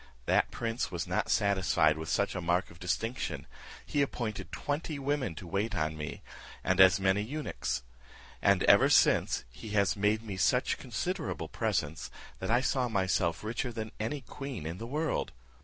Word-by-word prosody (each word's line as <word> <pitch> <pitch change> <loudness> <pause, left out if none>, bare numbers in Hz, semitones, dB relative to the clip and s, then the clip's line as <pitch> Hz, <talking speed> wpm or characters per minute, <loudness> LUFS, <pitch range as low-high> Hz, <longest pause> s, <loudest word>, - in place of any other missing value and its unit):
That - - +3
prince 115 +1 -2
was 85 -3 -2
not - - -1
satisfied 90 -6 +3
with 80 0 -6
such 100 - +1
a 95 - -3
mark 90 +2 0
of 85 - -15
distinction; 115 +7 -2 0.4
he 145 - 0
appointed 110 - -3
twenty 150 +1 -3
women 140 - -1
to 90 - -8
wait 100 +5 -1
on 80 -2 -1
me, 75 -1 -6 0.4
and 95 0 +1
as 95 +2 +7
many 95 +1 +2
eunuchs; 110 - -3 0.6
and - - +4
ever - - +6
since - - +4
he 110 - -9
has 100 -1 +3
made 105 +2 +1
me 100 -4 -5
such - - +2
considerable - - -3
presents, 75 +2 -1 0.3
that - - -4
I 120 +2 +4
saw 130 -2 +1
myself 95 -4 +1
richer 120 +3 -2
than 110 -2 -5
any 125 +7 -2
queen 130 - -7
in 85 +3 -5
the 115 - -5
world. 155 +5 -1
105 Hz, 170 wpm, -31 LUFS, 90-120 Hz, 0.6 s, as